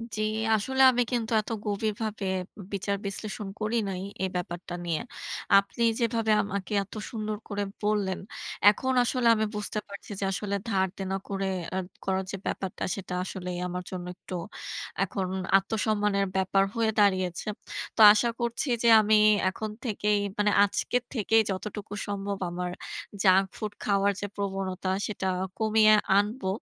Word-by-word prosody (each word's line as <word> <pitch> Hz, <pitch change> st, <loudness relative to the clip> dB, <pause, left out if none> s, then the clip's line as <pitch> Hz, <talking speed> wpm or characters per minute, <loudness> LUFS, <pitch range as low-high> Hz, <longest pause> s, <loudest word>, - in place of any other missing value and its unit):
জি, 215 Hz, -, -2 dB, 0.3 s
আসলে 265 Hz, +6 st, 0 dB
আমি 245 Hz, 0 st, +1 dB
কিন্তু 235 Hz, -2 st, -1 dB
এত -, -, -11 dB, 0.2 s
গভীরভাবে 215 Hz, 0 st, -2 dB, 0.5 s
বিচার 200 Hz, +1 st, -1 dB
বিশ্লেষণ 205 Hz, +1 st, -4 dB
করি 220 Hz, +2 st, 0 dB
নাই 185 Hz, -1 st, -4 dB, 0.2 s
এই 190 Hz, -, +1 dB
ব্যাপারটা 175 Hz, 0 st, -4 dB
নিয়ে। 165 Hz, -2 st, -1 dB, 0.6 s
আপনি 200 Hz, +4 st, +1 dB, 0.2 s
যেভাবে 230 Hz, -2 st, +1 dB
আমাকে 200 Hz, 0 st, -4 dB
এত 195 Hz, -, -14 dB, 0.2 s
সুন্দর 215 Hz, -2 st, -3 dB
করে 205 Hz, -1 st, -2 dB, 0.2 s
বললেন, 205 Hz, -3 st, +1 dB, 0.5 s
এখন 260 Hz, +5 st, 0 dB
আসলে 245 Hz, 0 st, +1 dB
আমি 220 Hz, 0 st, +1 dB
বুঝতে 210 Hz, 0 st, -2 dB
পারছি 200 Hz, +1 st, -10 dB
যে -, -, -2 dB
আসলে 200 Hz, +1 st, -2 dB
ধারদেনা 190 Hz, -1 st, -1 dB
করে 195 Hz, -1 st, -2 dB, 0.3 s
আ -, -, 0 dB, 0.3 s
করার 190 Hz, 0 st, 0 dB
যে 195 Hz, -, -4 dB
ব্যাপারটা 190 Hz, -1 st, -3 dB
সেটা 190 Hz, -2 st, -6 dB
আসলেই 180 Hz, -1 st, -5 dB
আমার 180 Hz, 0 st, -4 dB
জন্য 180 Hz, -1 st, -5 dB
একটু 185 Hz, -, -11 dB, 0.7 s
এখন 190 Hz, 0 st, -2 dB, 0.3 s
আত্মসম্মানের 210 Hz, 0 st, 0 dB
ব্যাপার 190 Hz, +1 st, +3 dB
হয়ে 225 Hz, -1 st, +2 dB
দাঁড়িয়েছে। 185 Hz, -3 st, +2 dB, 0.5 s
তো -, -, -9 dB
আশা 225 Hz, +3 st, +2 dB
করছি 235 Hz, +4 st, -1 dB, 0.2 s
যে -, -, +4 dB
আমি 215 Hz, +1 st, +4 dB, 0.3 s
এখন 215 Hz, +3 st, -5 dB, 0.2 s
থেকেই 210 Hz, -2 st, +1 dB, 0.2 s
মানে 210 Hz, 0 st, +3 dB
আজকে 205 Hz, +4 st, +1 dB, 0.2 s
থেকেই 225 Hz, -2 st, +3 dB
যতটুকু 205 Hz, +1 st, -5 dB
সম্ভব 200 Hz, 0 st, -3 dB
আমার 180 Hz, +1 st, -3 dB, 0.5 s
junk 190 Hz, 0 st, +6 dB
food 210 Hz, -1 st, -4 dB
খাওয়ার 200 Hz, 0 st, +3 dB
যে -, -, -1 dB
প্রবণতা 195 Hz, -2 st, -3 dB, 0.2 s
সেটা 200 Hz, -2 st, -3 dB, 0.3 s
কমিয়ে 215 Hz, 0 st, +5 dB, 0.2 s
আনবো। 205 Hz, +1 st, 0 dB
205 Hz, 145 wpm, -28 LUFS, 190-215 Hz, 0.7 s, junk